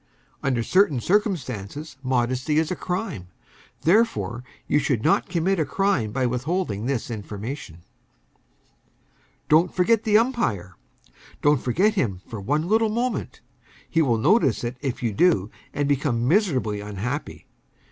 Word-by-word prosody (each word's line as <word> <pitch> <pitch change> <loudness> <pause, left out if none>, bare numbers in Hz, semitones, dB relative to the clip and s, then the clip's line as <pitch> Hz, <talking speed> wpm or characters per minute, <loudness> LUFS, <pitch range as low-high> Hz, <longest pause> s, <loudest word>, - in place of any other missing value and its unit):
Under 125 -4 0
certain 185 - +3
circumstances 150 - -1
modesty 130 +3 0
is 160 +1 +1
a - - 0
crime; 180 - -4 0.6
therefore, 175 - +2 0.2
you 145 - +3
should 125 -6 0
not - - +2
commit 175 +2 +1
a - - +3
crime 145 - 0
by 130 +2 0
withholding 125 - -2
this 130 -3 -2
information. 105 - -7 1.6
Don't 165 +4 +4
forget 215 +5 +2
the 215 -2 +4
umpire. 215 - 0 0.7
Don't 145 -2 +4
forget 185 - +2
him 105 - -1
for 110 -3 -7
one 150 - 0
little 220 +2 +3
moment. 240 +3 -2 0.5
He 165 - +1
will 120 -7 +2
notice 140 - +3
it 120 +1 -3
if 135 -3 -3
you 115 -3 0
do, 110 - +2 0.2
and 145 0 -1
become 135 -4 0
miserably 135 - +1
unhappy. 105 +8 -5
140 Hz, 135 wpm, -24 LUFS, 115-185 Hz, 1.6 s, Don't